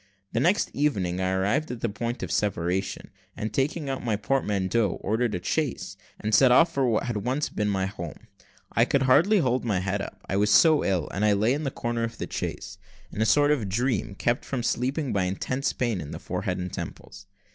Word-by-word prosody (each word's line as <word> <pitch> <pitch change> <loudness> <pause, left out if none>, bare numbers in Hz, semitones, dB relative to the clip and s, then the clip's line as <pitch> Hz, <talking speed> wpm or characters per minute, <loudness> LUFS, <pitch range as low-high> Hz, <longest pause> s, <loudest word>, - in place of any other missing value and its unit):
The - - 0
next 175 - +2
evening 95 -12 0
I 95 - +1
arrived 100 +11 0
at 125 -2 -6
the - - +1
point 115 +2 -4
of 85 - -4
separation, 95 0 -1 0.3
and 110 - -4
taking 145 +3 -1
out 135 -1 -3
my 115 -3 0
portmanteau, 105 -2 0
ordered 110 +2 0
a 90 - -5
chaise, 120 - -2 0.2
and 110 +1 -3
set 130 +1 +6
off 165 +6 +5
for 135 -2 +1
what 120 +1 0
once 130 +8 -1
had - - -21
been 105 0 0
my 95 -2 0
home. 85 -4 -7 0.5
I - - +3
could 140 -1 +2
hardly 160 +11 +5
hold 130 -7 +1
my 105 -6 0
head 95 +2 -1
up, - - -7
I 95 - -1
was 105 +1 +2
so 155 +8 +6
ill, 90 -5 0
and 100 - -3
I 105 -1 +4
lay 110 +5 +2
in 145 +1 -2
a - - +2
corner 120 -2 -3
of 115 -1 -4
the - - -3
chaise, - - -5 0.3
in 110 - -4
a 110 - +3
sort 145 +3 +4
of 120 -10 0
dream, 115 -1 -1
kept 120 +4 0
from 130 -3 -3
sleeping 130 +3 -1
from 100 - +1
intense 95 +9 -1
pain 115 -7 -1
in 75 - -7
the - - -6
forehead - - -3
and 90 0 -5
temples. 100 0 -8
115 Hz, 220 wpm, -26 LUFS, 100-130 Hz, 0.5 s, set